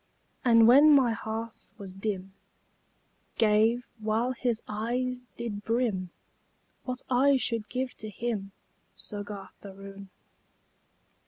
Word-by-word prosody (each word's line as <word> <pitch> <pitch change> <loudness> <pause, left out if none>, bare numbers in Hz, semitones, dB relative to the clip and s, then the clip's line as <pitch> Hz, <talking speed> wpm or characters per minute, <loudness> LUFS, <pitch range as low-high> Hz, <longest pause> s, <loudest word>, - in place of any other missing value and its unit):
And 230 -2 +6
when 290 +5 +8
my 250 -4 +4
hearth 225 0 -6
was 195 -3 -9
dim 195 -1 -4 1.0
Gave, 225 +2 +3
while 220 +3 0
his 240 -3 -1
eye 245 +4 -2 0.2
did 215 -3 -5
brim, 225 -6 0 0.8
What 255 0 -4
I 270 +2 +4
should 230 -4 -1
give 255 0 -3
to 215 - -7
him, 210 -2 -3 0.4
Soggarth 205 -1 -8
Aroon? 195 0 -10
225 Hz, 105 wpm, -28 LUFS, 205-245 Hz, 1.0 s, when